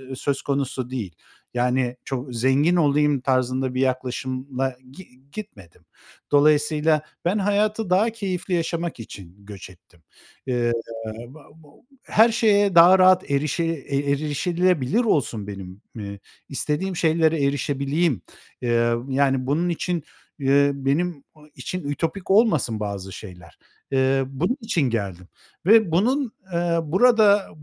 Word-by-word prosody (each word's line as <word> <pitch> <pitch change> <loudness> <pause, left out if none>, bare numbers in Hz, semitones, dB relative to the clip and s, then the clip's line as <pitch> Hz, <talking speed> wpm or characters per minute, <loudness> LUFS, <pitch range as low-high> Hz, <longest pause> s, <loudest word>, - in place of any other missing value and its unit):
eee, 130 0 -8
söz 140 +1 -2
konusu 135 -3 -2
değil. 110 -10 -5 0.4
Yani 125 0 0
çok 130 -1 -5
zengin 135 +8 +2
olayım 150 -3 +2
tarzında 130 0 0
bir 130 - -1
yaklaşımla 130 0 -2
gi 175 +8 -13 0.2
gitmedim. 100 - -11 0.5
Dolayısıyla 150 +1 +3 0.2
ben 185 +5 +1
hayatı 210 +1 0
daha 205 +6 +3
keyifli 190 -4 -3
yaşamak 170 -3 -2
için 95 -5 -10
göç 100 -3 -10
ettim. 85 -1 -22 0.4
Eee, 120 -2 0 0.6
ba 145 +4 -15
ba 160 -2 -20 0.3
her 220 +2 +4
şeye 205 -4 +3
daha 175 +3 +8
rahat 185 -3 +4
erişe 150 +4 0
e 150 -4 -3 0.2
erişilebilir 155 - 0
olsun, 115 - 0
benim, 95 -1 -9 0.2
ııı, 100 -1 -7 0.3
istediğim 160 +6 -2
şeylere 160 -2 +2
erişebileyim. 140 - 0 0.4
Eee, 120 -1 +2 0.2
yani 135 -1 +1
bunun 165 +6 0
için, 175 0 -2 0.4
eee, 140 0 +3
benim 140 +3 -1
o 150 -1 -19
için 185 0 -5
ütopik 165 +6 -3
olmasın 160 - +3
bazı 100 -2 -5
şeyler. 90 -5 -12 0.3
Eee, 135 0 +2
bunun 170 - -1
için 220 -8 -1
geldim 100 -7 -3 0.4
ve 220 -2 +5
bunun, 245 - +1 0.2
eee, 170 0 0
burada, 205 +3 +4
145 Hz, 125 wpm, -23 LUFS, 130-175 Hz, 0.6 s, daha